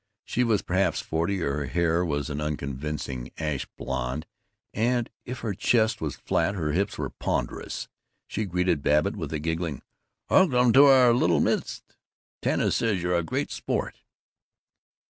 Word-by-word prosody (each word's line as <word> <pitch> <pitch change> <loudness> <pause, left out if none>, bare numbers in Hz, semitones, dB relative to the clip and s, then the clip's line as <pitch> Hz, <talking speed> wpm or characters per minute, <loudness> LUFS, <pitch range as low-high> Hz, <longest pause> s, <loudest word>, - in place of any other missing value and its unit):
She 125 - 0
was 110 -4 +1
perhaps 95 -2 +1
forty; 85 +5 -1
her 70 -1 -1
hair 85 +5 +1
was 75 -3 -2
an 75 +1 -3
unconvincing 70 -3 -4
ash 75 -4 -2
blond; 65 +3 -3 0.5
and 120 +2 0
if 125 +1 -6
her 110 -3 -2
chest 110 +2 +2
was 75 -4 -2
flat, 100 - 0
her 75 -5 -1
hips 100 +6 -1
were - - -3
ponderous. - - -3 0.4
She 110 - -2
greeted 90 -4 0
Babbitt 75 +1 +2
with - - -5
a 80 - -1
giggling 80 -1 -3 0.4
"Welcome 125 -10 +4
to 140 +2 +8
our 130 -3 +7
little 120 - +3
midst! - - 0 0.6
Tanis - - +1
says 105 -6 0
you're 90 0 0
a 85 - +2
real 80 - -1
sport." - - -3
85 Hz, 150 wpm, -26 LUFS, 75-110 Hz, 0.6 s, to